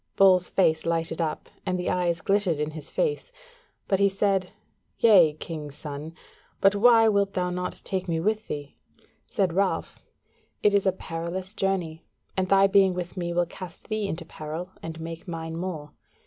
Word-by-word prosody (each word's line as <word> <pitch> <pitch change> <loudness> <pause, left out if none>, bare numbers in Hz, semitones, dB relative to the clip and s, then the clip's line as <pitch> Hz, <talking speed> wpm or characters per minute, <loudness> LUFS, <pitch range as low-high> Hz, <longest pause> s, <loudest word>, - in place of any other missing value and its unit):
Bull's 185 -2 +5
face 160 -4 +2
lighted 165 0 -1
up, 155 -2 -2 0.2
and 185 0 -1
the 180 - -1
eyes 175 -2 0
glittered 195 -4 +1
in 150 +1 -2
his 155 -1 -8
face; 485 0 -1 0.6
but 195 - +2
he 200 0 +5
said: 195 -1 +1 0.5
"Yea, 185 -9 +6
king's 150 -2 -7
son, 150 +2 -7 0.4
but 195 0 +5
why 225 +2 +6
wilt 200 -2 +2
thou 180 -1 -1
not 180 0 -4
take 190 -1 -2
me 165 -2 0
with 215 +5 0
thee?" 145 -1 -6 0.5
Said 185 -4 0
Ralph: 195 +1 0 0.6
"It 210 - +5
is 200 -1 +3
a - - +5
perilous 180 +2 -4
journey, 180 -6 -1 0.3
and 185 -1 0
thy 195 0 +6
being 195 -2 +4
with 180 0 -5
me 175 -2 -3
will 175 0 +2
cast 175 +2 -10
thee 215 -2 -1
into 165 -2 -4
peril 160 +4 -6
and 165 0 -7
make 165 +2 -7
mine 165 -1 -5
more. 165 -4 -5
180 Hz, 175 wpm, -26 LUFS, 165-195 Hz, 0.6 s, Yea